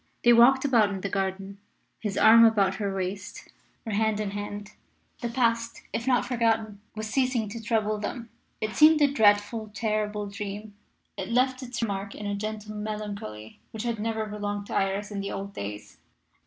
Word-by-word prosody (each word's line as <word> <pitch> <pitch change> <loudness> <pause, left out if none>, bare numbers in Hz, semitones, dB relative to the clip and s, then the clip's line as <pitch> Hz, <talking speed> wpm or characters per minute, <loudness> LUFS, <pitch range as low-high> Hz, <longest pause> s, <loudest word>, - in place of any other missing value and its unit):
They 240 - +7
walked 260 +4 +6
about 230 -7 +4
in 195 -2 -4
the 200 - -2
garden, 195 0 -3 0.4
his 210 -3 -3
arm 230 +1 +8
about 200 -4 +4
her 200 -2 -2
waist, 190 +1 -5 0.4
or 225 - -4
hand 215 0 +1
in 210 -2 -2
hand. 205 0 -6 0.5
The 240 - -2
past, 230 -1 0
if 235 - -3
not 250 -2 +3
forgotten, 225 -4 0
was 215 0 -4
ceasing 250 -2 +1
to 230 +2 -7
trouble 215 -1 0
them; 230 +2 -5 0.3
it 215 0 -3
seemed 310 0 +7
a 280 -1 +3
dreadful, 215 -1 +3
terrible 210 -2 -1
dream. 205 +1 -6 0.4
It - - -4
left 255 +2 +2
its 245 -2 -4
mark 200 -2 -3
in 210 - -7
a 205 - -1
gentle 215 +1 -5
melancholy 210 - -6
which 220 0 -6
had 235 -2 -2
never 220 0 -1
belonged 205 -1 -4
to - - -8
Iris 195 +2 0
in 205 - -4
the 200 0 -4
old 200 +1 -5
days. 105 - -7
215 Hz, 180 wpm, -27 LUFS, 200-230 Hz, 0.5 s, arm